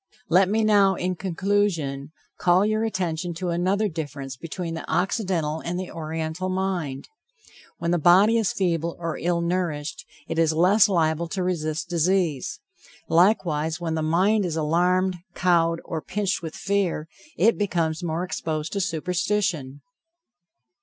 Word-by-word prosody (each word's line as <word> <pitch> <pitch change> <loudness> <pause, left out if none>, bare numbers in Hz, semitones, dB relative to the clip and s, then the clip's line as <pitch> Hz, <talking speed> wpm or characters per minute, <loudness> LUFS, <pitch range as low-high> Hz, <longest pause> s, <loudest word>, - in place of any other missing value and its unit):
Let 185 +2 +5
me 220 +2 +1
now, 200 -3 +4
in 180 +1 -1
conclusion, 170 -7 -1 0.3
call 180 +3 +4
your 215 +1 +1
attention 175 -5 -2
to 180 +1 -3
another 185 +5 +1
difference 145 -6 -6
between 165 +5 -5
the 165 - -6
Occidental 175 -5 0
and 175 +2 -4
the 185 - -5
Oriental 160 +2 -4
mind. 185 -8 -2 0.7
When 170 0 -1
the 175 - +2
body 195 +8 +5
is 220 - +1
feeble 170 -3 -1
or 165 -2 -4
ill 170 0 0
nourished, 170 -4 -2 0.2
it 165 - -2
is 160 -1 +3
less 195 +6 +5
liable 165 -2 +1
to 185 +2 -3
resist 165 -3 -2
disease; 170 -4 0 0.5
likewise 165 -4 +2
when 165 -2 -2
the 160 - -1
mind 185 +7 +2
is 170 -4 -2
alarmed, 180 +4 +1 0.2
cowed, 165 -2 +2
or 160 -2 -4
pinched 200 +1 -2
with 160 -2 -6
fear, 190 -5 -1 0.3
it 225 +1 +3
becomes 170 -5 0
more 170 0 -2
exposed 160 -3 -3
to 200 - 0
superstition. 170 -4 -1
175 Hz, 145 wpm, -24 LUFS, 160-190 Hz, 0.7 s, Let